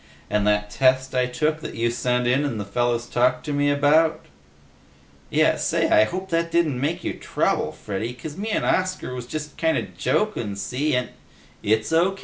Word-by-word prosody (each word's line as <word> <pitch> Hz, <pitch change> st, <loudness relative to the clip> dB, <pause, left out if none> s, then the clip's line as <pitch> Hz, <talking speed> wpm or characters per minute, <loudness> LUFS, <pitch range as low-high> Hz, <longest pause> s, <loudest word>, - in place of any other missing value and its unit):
"And 105 Hz, 0 st, +1 dB
that 105 Hz, 0 st, +1 dB
test 130 Hz, +1 st, +2 dB
I 125 Hz, -1 st, +2 dB
took 155 Hz, +5 st, -1 dB
that -, -, -7 dB
you 115 Hz, +1 st, 0 dB
sent 125 Hz, 0 st, 0 dB
in 130 Hz, +4 st, +2 dB
and 135 Hz, -7 st, -2 dB
the 100 Hz, -, -4 dB
fellas 120 Hz, +3 st, 0 dB
talked 125 Hz, +1 st, +1 dB
to 150 Hz, -, -2 dB
me 145 Hz, 0 st, +2 dB
about?" 150 Hz, +3 st, +3 dB, 1.0 s
"Yeh! -, -, +3 dB
Say, -, -, +1 dB
I 110 Hz, -, +6 dB
hope 185 Hz, +7 st, -5 dB
that 165 Hz, 0 st, 0 dB
didn't 160 Hz, -7 st, +1 dB
make 150 Hz, +5 st, -1 dB
you -, -, -2 dB
trouble, -, -, -1 dB
Freddy, 105 Hz, +4 st, -4 dB
'cuz 145 Hz, +4 st, -8 dB
me 210 Hz, +5 st, -4 dB
'n' -, -, 0 dB
Oscar 185 Hz, -8 st, 0 dB
was 125 Hz, -1 st, -6 dB
just 150 Hz, +2 st, -6 dB
kinda 160 Hz, -1 st, +1 dB
jokin', 120 Hz, -, -1 dB
see, 125 Hz, +9 st, -1 dB
and 125 Hz, -1 st, -1 dB, 0.3 s
" -, -, -28 dB
"It's 110 Hz, +6 st, +1 dB
O. 180 Hz, +4 st, +3 dB
130 Hz, 190 wpm, -23 LUFS, 120-160 Hz, 1.0 s, I